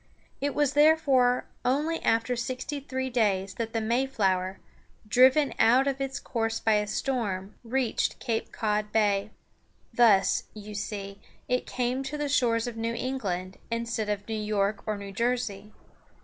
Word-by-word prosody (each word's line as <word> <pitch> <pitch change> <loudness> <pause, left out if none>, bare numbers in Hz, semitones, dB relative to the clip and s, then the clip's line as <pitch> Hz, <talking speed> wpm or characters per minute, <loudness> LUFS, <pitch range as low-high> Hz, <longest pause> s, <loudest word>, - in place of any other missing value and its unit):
It 285 +1 -1
was 290 -2 +2
therefore 285 -5 +4 0.2
only 295 +6 0
after 230 +2 +1
sixty 255 +4 -4
three 260 -1 -4
days 200 -5 +1
that 225 +3 -4
the 225 - -1
Mayflower, 220 -6 0 0.5
driven 260 +6 +5
out 250 +4 +5
of 275 -1 -1
its 270 -1 -3
course 225 -1 -2
by 220 - +2
a 210 0 -1
storm, 205 -5 -2
reached 245 0 0
Cape 230 -3 -2
Cod 210 -1 -1
Bay. 205 -2 +2 0.6
Thus, 215 -5 +4
you 210 0 -9
see, 200 -1 -5 0.3
it 250 0 0
came 250 +1 -1
to 270 +2 -4
the 295 -1 -2
shores 240 -5 +2
of 240 -2 -5
New 230 +1 -2
England 195 -8 -3
instead 230 -2 -2
of 205 0 -3
New 225 - -3
York 210 -1 0
or 215 -1 -1
New 200 -1 -7
Jersey. 215 -2 -2
230 Hz, 150 wpm, -27 LUFS, 210-260 Hz, 0.6 s, driven